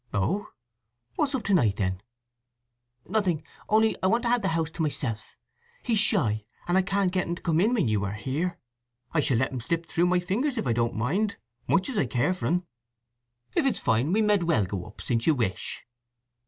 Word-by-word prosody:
"Oh? 190 Hz, -, 0 dB, 0.7 s
What's 285 Hz, -2 st, +1 dB
up 250 Hz, -, -2 dB
to 200 Hz, -, +1 dB
night, 115 Hz, -, +3 dB
then?" 95 Hz, -3 st, -1 dB, 1.1 s
"Nothing. 185 Hz, -6 st, 0 dB, 0.3 s
Only 220 Hz, +1 st, +4 dB
I 185 Hz, -, +2 dB
want 230 Hz, +5 st, +2 dB
the 235 Hz, -4 st, +2 dB
house 165 Hz, -2 st, 0 dB
to 165 Hz, -, -5 dB
myself. 120 Hz, -8 st, -3 dB, 0.5 s
He's 230 Hz, -4 st, +2 dB
shy; 130 Hz, -, +2 dB, 0.2 s
and 175 Hz, -, +2 dB
I 190 Hz, -, +5 dB
can't 195 Hz, 0 st, +1 dB
get 185 Hz, -1 st, 0 dB
un 170 Hz, -, -1 dB
to -, -, -12 dB
come 165 Hz, -1 st, +2 dB
in 225 Hz, +6 st, +3 dB
when 200 Hz, -, +2 dB
you 105 Hz, -2 st, +1 dB
are 100 Hz, -, -3 dB
here. 145 Hz, -, -2 dB, 0.6 s
I 165 Hz, -, +3 dB
shall 135 Hz, -4 st, +2 dB
let 130 Hz, -, +1 dB
him 130 Hz, -2 st, -4 dB
slip 165 Hz, +7 st, -1 dB
through 170 Hz, +1 st, +1 dB
my 180 Hz, 0 st, +3 dB
fingers 235 Hz, +10 st, -1 dB
if -, -, -1 dB
I 120 Hz, -, +2 dB
don't 115 Hz, 0 st, 0 dB
mind, 190 Hz, -, 0 dB, 0.3 s
much 190 Hz, -, +2 dB
as 260 Hz, -, -3 dB
I 135 Hz, -, +1 dB
care 130 Hz, +9 st, +1 dB
for 185 Hz, -, -3 dB
'n!" 180 Hz, +1 st, +1 dB, 0.9 s
"If 345 Hz, -, +2 dB
it 260 Hz, -, +2 dB
is -, -, -3 dB
fine 120 Hz, +8 st, +1 dB
we 215 Hz, +3 st, +3 dB
med 210 Hz, -1 st, +4 dB
as 170 Hz, -, -2 dB
well 110 Hz, -, +3 dB
go, 100 Hz, +2 st, -6 dB
since 115 Hz, -2 st, -1 dB
you 160 Hz, -, +5 dB
wish." 110 Hz, -7 st, -2 dB
170 Hz, 210 wpm, -27 LUFS, -, 1.1 s, I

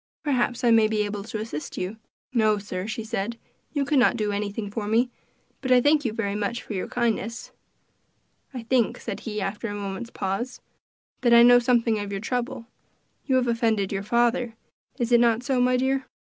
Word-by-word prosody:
Perhaps 250 Hz, -5 st, 0 dB
I 240 Hz, -, +5 dB
may 225 Hz, -1 st, +6 dB
be 215 Hz, -1 st, 0 dB
able 205 Hz, -1 st, -4 dB
to 220 Hz, -, -5 dB
assist 215 Hz, -8 st, -6 dB
you." 190 Hz, +4 st, -3 dB, 0.4 s
"No, 215 Hz, -3 st, +3 dB
sir," 195 Hz, -1 st, -5 dB
she 225 Hz, 0 st, -4 dB
said, 230 Hz, 0 st, -3 dB, 0.3 s
"you 285 Hz, -2 st, 0 dB
could 280 Hz, 0 st, +3 dB
not 240 Hz, -, +4 dB
do 210 Hz, -2 st, 0 dB
anything 205 Hz, 0 st, -3 dB
for 210 Hz, -1 st, -4 dB
me; 235 Hz, +3 st, +2 dB, 0.5 s
but 260 Hz, -, -2 dB
I 250 Hz, -, +7 dB
thank 290 Hz, +3 st, +3 dB
you 230 Hz, -, +1 dB
very 215 Hz, -2 st, -2 dB
much 210 Hz, +3 st, -2 dB
for -, -, -7 dB
your 185 Hz, -, -3 dB
kindness." 230 Hz, -1 st, -2 dB, 1.0 s
"I 250 Hz, -4 st, -6 dB
think," 235 Hz, -1 st, +1 dB
said -, -, -5 dB
he, 215 Hz, -1 st, -4 dB
after 205 Hz, +4 st, -3 dB
a 205 Hz, -, -4 dB
moment's 200 Hz, +3 st, -5 dB
pause, 205 Hz, +6 st, -3 dB, 0.6 s
"that 240 Hz, -2 st, +5 dB
I 235 Hz, -, +9 dB
know 245 Hz, 0 st, +8 dB
something 235 Hz, -2 st, +2 dB
of 205 Hz, -1 st, -5 dB
your 195 Hz, -, -2 dB
trouble; 240 Hz, +1 st, -3 dB, 0.6 s
you 265 Hz, -, +2 dB
have 255 Hz, -1 st, +2 dB
offended 225 Hz, -4 st, +1 dB
your 195 Hz, -1 st, -2 dB
father; 235 Hz, +2 st, +1 dB, 0.4 s
is 240 Hz, 0 st, -1 dB
it 240 Hz, -, +6 dB
not 235 Hz, 0 st, +3 dB
so, 255 Hz, -1 st, +1 dB
my 250 Hz, 0 st, +3 dB
dear?" 265 Hz, +1 st, 0 dB
230 Hz, 200 wpm, -25 LUFS, 210-245 Hz, 1.0 s, I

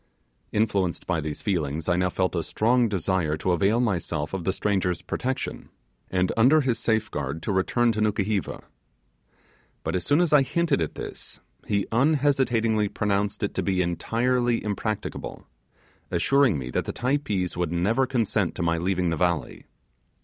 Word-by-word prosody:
Influenced 100 Hz, -5 st, 0 dB
by 85 Hz, -3 st, 0 dB
these 75 Hz, 0 st, -5 dB
feelings, 80 Hz, -5 st, -1 dB
I 85 Hz, -, +3 dB
now 90 Hz, +1 st, +1 dB
felt 95 Hz, 0 st, -1 dB
a 85 Hz, -, +1 dB
strong 120 Hz, +7 st, +2 dB
desire 90 Hz, -5 st, 0 dB
to 90 Hz, -, 0 dB
avail 100 Hz, +6 st, +2 dB
myself 85 Hz, -9 st, -1 dB
of 95 Hz, -4 st, -3 dB
the 95 Hz, -, +2 dB
stranger's 95 Hz, -3 st, -1 dB
protection, 130 Hz, +1 st, -3 dB, 0.4 s
and 90 Hz, 0 st, +1 dB
under 130 Hz, +7 st, +5 dB
his 125 Hz, -4 st, 0 dB
safeguard 80 Hz, -, -1 dB
to -, -, -1 dB
return 115 Hz, +5 st, +2 dB
to 110 Hz, -1 st, -2 dB
Nukuheva. 105 Hz, -1 st, -1 dB, 1.2 s
But -, -, -2 dB
as 90 Hz, -, -1 dB
soon 145 Hz, +2 st, +3 dB
as 175 Hz, -3 st, +2 dB
I 145 Hz, -, +7 dB
hinted 150 Hz, -, +1 dB
at 80 Hz, -, -2 dB
this, -, -, -8 dB, 0.3 s
he 100 Hz, -2 st, +1 dB
unhesitatingly 125 Hz, -5 st, +2 dB
pronounced 100 Hz, +1 st, -1 dB
it 100 Hz, -, -1 dB
to -, -, -1 dB
be 95 Hz, -2 st, +1 dB
entirely 120 Hz, +7 st, 0 dB
impracticable; 105 Hz, 0 st, -4 dB, 0.6 s
assuring 125 Hz, -, +3 dB
me 65 Hz, -2 st, -5 dB
that -, -, -1 dB
the -, -, -4 dB
Typees 120 Hz, -9 st, -1 dB
would 85 Hz, -2 st, -1 dB
never 105 Hz, +10 st, +1 dB
consent 110 Hz, -6 st, 0 dB
to 90 Hz, -, -2 dB
my 85 Hz, 0 st, +1 dB
leaving 90 Hz, 0 st, 0 dB
the 80 Hz, -, -1 dB
valley. 85 Hz, -6 st, -1 dB
100 Hz, 160 wpm, -25 LUFS, 90-120 Hz, 1.2 s, I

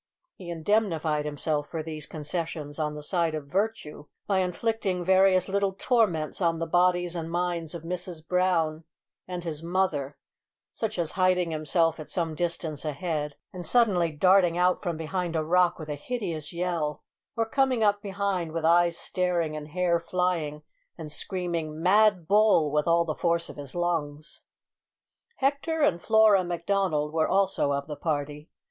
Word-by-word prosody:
He 180 Hz, -2 st, -10 dB
indemnified 165 Hz, -4 st, 0 dB
himself 150 Hz, 0 st, -1 dB
for 160 Hz, -2 st, -4 dB
these 155 Hz, -1 st, -5 dB
concessions 155 Hz, -1 st, -5 dB
on 150 Hz, -1 st, -1 dB
the 150 Hz, -, -8 dB
side 170 Hz, -1 st, 0 dB
of 150 Hz, -2 st, -5 dB
virtue 185 Hz, -4 st, -3 dB, 0.2 s
by 195 Hz, -2 st, +1 dB
inflicting 185 Hz, 0 st, -1 dB
various 190 Hz, 0 st, +4 dB
little 200 Hz, 0 st, 0 dB
torments 195 Hz, -8 st, 0 dB
on 165 Hz, -2 st, +2 dB
the 165 Hz, -, -2 dB
bodies 175 Hz, +1 st, +2 dB
and 165 Hz, -1 st, -4 dB
minds 175 Hz, -1 st, -2 dB
of 165 Hz, -, -7 dB
Mrs 175 Hz, -2 st, -6 dB
Brown 170 Hz, -4 st, +1 dB, 0.4 s
and 180 Hz, -1 st, -5 dB
his 160 Hz, -3 st, -4 dB
mother, 165 Hz, -5 st, -1 dB, 0.5 s
such 220 Hz, -2 st, -3 dB
as 170 Hz, -3 st, -1 dB
hiding 185 Hz, -2 st, +2 dB
himself 160 Hz, +1 st, +1 dB
at 155 Hz, -, -8 dB
some 165 Hz, -3 st, -1 dB
distance 165 Hz, -2 st, -3 dB
ahead, 150 Hz, -1 st, -3 dB, 0.2 s
and 180 Hz, -1 st, -6 dB
suddenly 180 Hz, -4 st, +3 dB
darting 180 Hz, +2 st, +4 dB
out 180 Hz, +1 st, +2 dB
from 170 Hz, -2 st, -3 dB
behind 170 Hz, +1 st, -3 dB
a 160 Hz, -, +1 dB
rock 180 Hz, +2 st, +3 dB
with 155 Hz, -, -8 dB
a 150 Hz, -, -3 dB
hideous 165 Hz, -, -4 dB
yell; 170 Hz, -4 st, -2 dB, 0.3 s
or 225 Hz, 0 st, +1 dB
coming 255 Hz, -1 st, +1 dB
up 205 Hz, -1 st, +2 dB
behind 195 Hz, -5 st, -2 dB
with 165 Hz, -1 st, -2 dB
eyes 170 Hz, 0 st, +4 dB
staring 175 Hz, -4 st, -1 dB
and 150 Hz, -1 st, -6 dB
hair 170 Hz, +1 st, +1 dB
flying, 170 Hz, -3 st, -1 dB, 0.4 s
and 150 Hz, -, -7 dB
screaming 170 Hz, -4 st, -2 dB
"mad 190 Hz, -1 st, +4 dB
bull," 205 Hz, -7 st, +4 dB
with 150 Hz, +1 st, +1 dB
all 170 Hz, 0 st, +3 dB
the 155 Hz, -, -2 dB
force 170 Hz, +1 st, 0 dB
of -, -, -9 dB
his 140 Hz, 0 st, -9 dB
lungs. 160 Hz, -4 st, -3 dB, 0.9 s
Hector 285 Hz, +3 st, 0 dB
and 170 Hz, -12 st, +2 dB
Flora 220 Hz, -3 st, +5 dB
Macdonald 175 Hz, -3 st, -1 dB
were 160 Hz, -1 st, +2 dB
also 190 Hz, -6 st, +1 dB
of 140 Hz, 0 st, -1 dB
the 150 Hz, -, -6 dB
party. 150 Hz, -1 st, -3 dB
170 Hz, 160 wpm, -27 LUFS, 155-185 Hz, 0.9 s, Flora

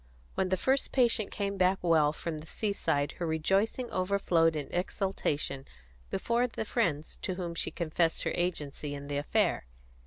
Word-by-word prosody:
When 190 Hz, -, 0 dB
the 185 Hz, -, +2 dB
first 265 Hz, +7 st, +1 dB
patient 235 Hz, -5 st, +3 dB
came 200 Hz, -1 st, -2 dB
back 185 Hz, +1 st, +4 dB
well 160 Hz, -4 st, +4 dB
from 155 Hz, 0 st, -5 dB
the 155 Hz, -, -10 dB
seaside 160 Hz, -10 st, 0 dB
her 170 Hz, -, -1 dB
rejoicing 195 Hz, +10 st, +1 dB
overflowed 185 Hz, -4 st, +2 dB
in 145 Hz, -3 st, -3 dB
exultation 165 Hz, -7 st, -1 dB, 0.4 s
before 235 Hz, -, +1 dB
the 225 Hz, -2 st, -4 dB
friends 165 Hz, -10 st, -1 dB
to 185 Hz, -, -2 dB
whom 175 Hz, -2 st, -4 dB
she 170 Hz, -, 0 dB
confessed 165 Hz, -1 st, 0 dB
her -, -, -1 dB
agency 150 Hz, -4 st, -2 dB
in 140 Hz, 0 st, -8 dB
the 145 Hz, -, -1 dB
affair. 145 Hz, -, +1 dB
175 Hz, 160 wpm, -30 LUFS, 155-200 Hz, 0.4 s, back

